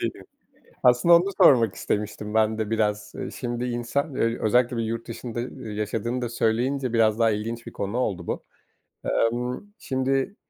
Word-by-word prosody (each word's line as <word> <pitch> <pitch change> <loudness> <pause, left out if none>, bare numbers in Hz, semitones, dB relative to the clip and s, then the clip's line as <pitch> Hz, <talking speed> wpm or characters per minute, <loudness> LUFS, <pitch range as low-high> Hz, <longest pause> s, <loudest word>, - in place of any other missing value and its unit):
Değil - - -1
mi? - - -13 0.6
Aslında 125 +8 +6
onu 170 +2 +6 0.2
sormak 115 -7 +6
istemiştim 105 0 -3
ben 110 0 +2
de 110 0 -2
biraz. 105 -1 0
Eee, - - -4
şimdi 120 -1 -4
insan, 120 +4 -2
öy 115 -2 0
özellikle 120 +2 +2
bir 115 - 0
yurt 115 +1 -4
dışında, 115 0 -6
ııı, 125 -1 -7
yaşadığını 110 +4 -2
da 120 - -1
söyleyince 120 +3 0
biraz 110 -2 +3
daha 115 -1 +4
ilginç 115 +3 -3
bir - - -8
konu 100 +4 -3
oldu 90 -8 -1
bu. - - -3 0.9
Emm, 125 - -3
şimdi 135 +7 -1
115 Hz, 170 wpm, -25 LUFS, 110-125 Hz, 0.9 s, Aslında